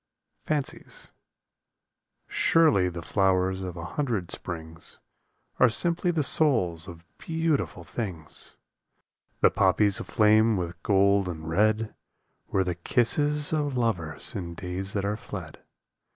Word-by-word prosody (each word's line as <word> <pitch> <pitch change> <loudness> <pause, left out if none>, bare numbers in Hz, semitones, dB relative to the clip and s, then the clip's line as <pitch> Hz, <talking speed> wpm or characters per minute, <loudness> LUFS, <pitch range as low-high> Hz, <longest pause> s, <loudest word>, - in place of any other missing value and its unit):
108 150 -3 -2
FANCIES - - -10 1.2
Surely 105 - +3
the 85 -1 -7
flowers 95 -1 +1
of 90 -2 -6
a 85 - -6
hundred 110 - -2
springs 80 -1 -7 0.6
Are 125 - +6
simply 170 - +2
the 165 -3 +1
souls 95 - +3
of 85 -1 -11
beautiful 160 -3 -1
things! 90 -10 -7 0.9
The - - +5
poppies 100 +1 +3
aflame 110 0 +3
with 85 -1 -5
gold 100 -1 +3
and 80 -2 -7
red 110 +5 +1 0.5
Were 95 - +1
the 90 -1 -2
kisses 145 - +1
of 145 -4 -1
lovers 90 -11 -2
in 85 -6 -5
days 90 +3 -5
that 100 -1 -1
are 105 +1 -1
fled. - - -8
100 Hz, 125 wpm, -26 LUFS, 90-125 Hz, 1.2 s, Are